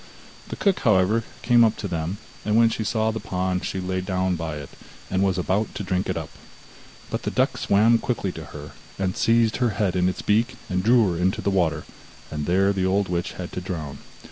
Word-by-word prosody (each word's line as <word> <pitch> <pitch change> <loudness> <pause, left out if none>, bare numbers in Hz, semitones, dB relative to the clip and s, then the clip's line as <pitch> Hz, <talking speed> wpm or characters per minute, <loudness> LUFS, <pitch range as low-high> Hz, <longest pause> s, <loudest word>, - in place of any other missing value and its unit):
The - - -5
cook, 195 -2 +1
however, 105 0 +3 0.2
came 120 -1 +5
up 110 -1 +2
to 105 - -4
them, 85 +2 -3 0.3
and 105 0 0
when 115 0 +5
she 110 - -2
saw 110 +1 +1
the 110 - -4
pond 90 -1 -2
she 95 - -3
lay 95 0 -2
down 95 -1 0
by 80 -2 -4
it, 75 -2 -8 0.4
and 95 0 +1
was 95 -2 +2
about 95 +4 -1
to 100 - -4
drink 95 -1 -1
it - - -1
up. - - -6 0.8
But - - -2
the - - -2
duck - - +1
swam 110 +4 +3
quickly 115 -6 -2
to 80 -3 -8
her, 75 0 -9 0.4
seized 115 0 +2
her 125 -2 +2
head 100 -4 +1
in 90 0 +3
its 95 - -5
beak 115 +4 +2 0.2
and 90 0 +1
drew 115 -2 +4
her 85 - -3
into 95 +1 +1
the 100 - +1
water, 80 -5 +1 0.5
and 75 -1 -3
there 95 +3 +3
the 95 -1 -1
old 95 +1 +1
witch 85 -1 -2
had 90 -1 -7
to 90 - -4
drown. 80 -6 -5
95 Hz, 220 wpm, -24 LUFS, 90-110 Hz, 0.8 s, came